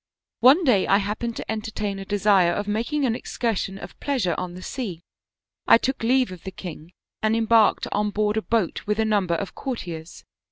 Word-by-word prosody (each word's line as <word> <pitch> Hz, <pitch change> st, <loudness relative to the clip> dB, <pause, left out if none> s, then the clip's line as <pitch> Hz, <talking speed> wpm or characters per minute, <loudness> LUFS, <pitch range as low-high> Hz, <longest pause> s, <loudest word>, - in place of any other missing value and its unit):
One 270 Hz, +10 st, +6 dB
day 235 Hz, -, +3 dB
I 195 Hz, -, +5 dB
happened 215 Hz, +3 st, -3 dB
to -, -, -5 dB
entertain 215 Hz, -2 st, -3 dB
a 195 Hz, -, -7 dB
desire 195 Hz, -3 st, +3 dB
of 205 Hz, +2 st, -3 dB
making 235 Hz, +8 st, 0 dB
an 235 Hz, -, +1 dB
excursion 225 Hz, -5 st, -2 dB
of 175 Hz, -, -11 dB
pleasure 250 Hz, -12 st, 0 dB
on 180 Hz, -1 st, -5 dB
the 185 Hz, -, -9 dB
sea. 190 Hz, -10 st, -5 dB, 0.6 s
I -, -, +8 dB
took 265 Hz, +3 st, -2 dB
leave 250 Hz, 0 st, +2 dB
of 180 Hz, -2 st, -10 dB
the -, -, -5 dB
king 175 Hz, -2 st, -9 dB, 0.3 s
and 220 Hz, +1 st, +2 dB
embarked 225 Hz, -1 st, +3 dB
on 210 Hz, 0 st, 0 dB
board 210 Hz, +1 st, 0 dB
a 220 Hz, -, +1 dB
boat 220 Hz, -5 st, -1 dB
with 210 Hz, 0 st, +1 dB
a 220 Hz, -, +2 dB
number 200 Hz, -5 st, +1 dB
of 195 Hz, +3 st, -4 dB
courtiers. 175 Hz, -, -6 dB
210 Hz, 195 wpm, -24 LUFS, 190-230 Hz, 0.6 s, I